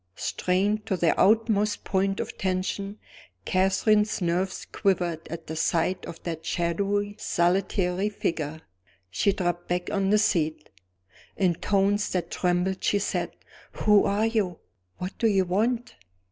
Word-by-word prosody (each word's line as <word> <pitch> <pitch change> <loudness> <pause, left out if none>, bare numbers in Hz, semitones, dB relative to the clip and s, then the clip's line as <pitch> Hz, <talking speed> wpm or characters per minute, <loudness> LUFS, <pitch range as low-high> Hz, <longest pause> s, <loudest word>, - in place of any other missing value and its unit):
Strained 200 +4 0
to 190 - 0
their 170 -2 +3
utmost 215 0 +2
point 195 0 0
of - - -4
tension, 195 +2 -2 0.5
Catherine's 200 +3 +2
nerves 180 +1 -1
quivered 175 -4 0
at 170 - -7
the 160 - -5
sight 170 +3 0
of 165 - -9
that 165 -2 -4
shadowy 200 +5 -1
solitary 185 +2 +1
figure. 160 -6 -3 0.5
She 200 - +2
dropped 175 -2 -2
back 180 0 -2
on 195 -1 +1
the 210 - +5
seat. 160 -7 0 0.7
In 185 -3 +3
tones 200 +3 +1
that 175 -2 -2
trembled 180 +1 0
she 205 - +3
said: 200 - -2 0.4
"Who 210 -2 +4
are 205 +2 +1
you? 210 -7 0 0.4
What 180 +2 -5
do 230 - +3
you 195 -3 +3
want?" 230 +7 0
190 Hz, 135 wpm, -26 LUFS, 175-205 Hz, 0.7 s, the